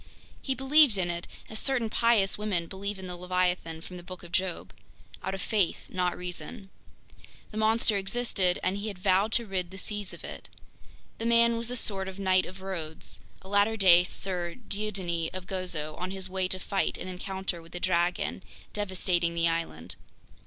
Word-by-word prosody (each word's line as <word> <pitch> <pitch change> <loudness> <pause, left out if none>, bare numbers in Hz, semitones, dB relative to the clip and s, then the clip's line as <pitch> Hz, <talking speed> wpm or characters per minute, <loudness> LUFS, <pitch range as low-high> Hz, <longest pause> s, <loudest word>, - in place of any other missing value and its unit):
He 270 - -1
believed 270 -3 +6
in 175 -2 +1
it 170 +1 -5 0.2
as 220 - -5
certain 265 -4 +3
pious 220 -3 +3
women 205 -5 0
believe 200 +3 -5
in 190 - -8
the 180 -1 -4
leviathan 180 -2 0
from 180 +2 -9
the - - -8
Book 180 0 -9
of 170 - -11
Job—out 190 +1 -4
of 190 - -6
faith, 205 -6 0
not 180 -1 0
reason. 190 +3 -7 0.8
The 215 - -7
monster 220 -1 +3
existed, 195 -3 +1
and 185 +2 +1
he 205 +2 -4
had 200 -3 -4
vowed 190 +3 +3
to 235 - +3
rid 185 -3 -2
the 190 - -10
seas 205 0 -2
of - - -11
it. - - -8 0.7
The 225 - -1
man 235 0 +6
was 230 0 +1
a 250 - -1
sort 195 -5 +1
of 190 0 -6
Knight 185 -1 +3
of 190 +1 -10
Rhodes, 170 -5 -5 0.2
a - - -12
latter 205 +3 +3
day 180 -3 +8
Sir 180 -2 -3
Dieudonné 190 -5 -1
of 185 -1 -4
Gozo, 180 -5 -2
on 180 +1 -2
his 190 0 -3
way 185 0 0
to 185 - 0
fight 195 +1 -1
an - - -6
encounter 185 -1 -3
with 165 0 -16
the 175 - -4
dragon 175 +1 +1 0.3
devastating 180 -4 0
the 170 0 +3
island. 90 - -2
190 Hz, 185 wpm, -29 LUFS, 180-205 Hz, 0.8 s, day